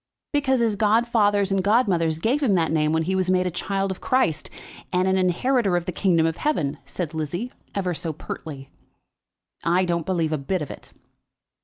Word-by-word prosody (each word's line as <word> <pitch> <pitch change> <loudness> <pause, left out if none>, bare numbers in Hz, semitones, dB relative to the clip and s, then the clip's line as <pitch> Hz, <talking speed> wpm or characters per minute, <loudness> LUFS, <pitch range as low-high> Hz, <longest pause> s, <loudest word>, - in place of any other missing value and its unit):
"Because 265 -3 +2
his 225 -3 +2
godfathers 210 -2 +2
and 195 -1 +1
godmothers 190 -7 +2
gave 240 - 0
him 225 -9 +3
that 165 -3 +1
name 155 -1 +2
when 160 0 +1
he 185 +4 -1
was 185 -1 0
made 185 0 +2
a 180 - -1
child 195 +2 -2
of 190 - -7
Christ, 170 - +1 0.4
and 180 +1 +2
an 190 - +3
inheritor 190 +2 +2
of 175 - -3
the - - -2
kingdom 170 -3 +2
of 165 0 -1
heaven," 155 - -1
said 170 -3 -4
Lizzie, 165 - -3 0.2
ever 185 -3 -1
so 165 0 -3
pertly. 145 -2 -8 1.0
"I 180 +2 +2
don't 170 -2 -1
believe 170 -4 0
a 155 - 0
bit 170 +4 -2
of 145 - -7
it." - - -12
185 Hz, 190 wpm, -24 LUFS, 165-205 Hz, 1.0 s, him